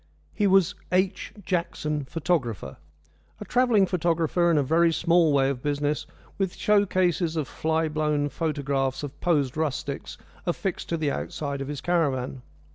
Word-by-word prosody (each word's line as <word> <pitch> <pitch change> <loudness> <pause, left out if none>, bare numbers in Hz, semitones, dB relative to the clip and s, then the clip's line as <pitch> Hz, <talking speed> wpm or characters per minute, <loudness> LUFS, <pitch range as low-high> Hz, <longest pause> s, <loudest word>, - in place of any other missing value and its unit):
He 205 - +2
was 190 -3 +4 0.2
"H. 185 +1 0
Jackson, 155 -5 -1
photographer," 135 - -2 0.6
a - - -7
travelling 245 -5 +3
photographer 170 -1 +1
in 165 - +3
a 145 - +3
very 165 +4 +3
small 170 -1 +3
way 135 -1 +3
of 125 -3 -5
business, 145 0 -1 0.3
with 190 -2 -1
show 205 -1 +3
cases 175 -3 +1
of 155 -4 -1
fly 160 0 0
blown 150 -1 0
photographs 140 -3 -1
of 145 - -7
posed 145 -7 +1
rustics 145 -2 -3 0.3
affixed 180 +2 -2
to 170 - 0
the 155 -3 0
outside 140 -1 -4
of 135 - -4
his 145 -2 -5
caravan. 135 -7 0
160 Hz, 150 wpm, -26 LUFS, 145-175 Hz, 0.6 s, was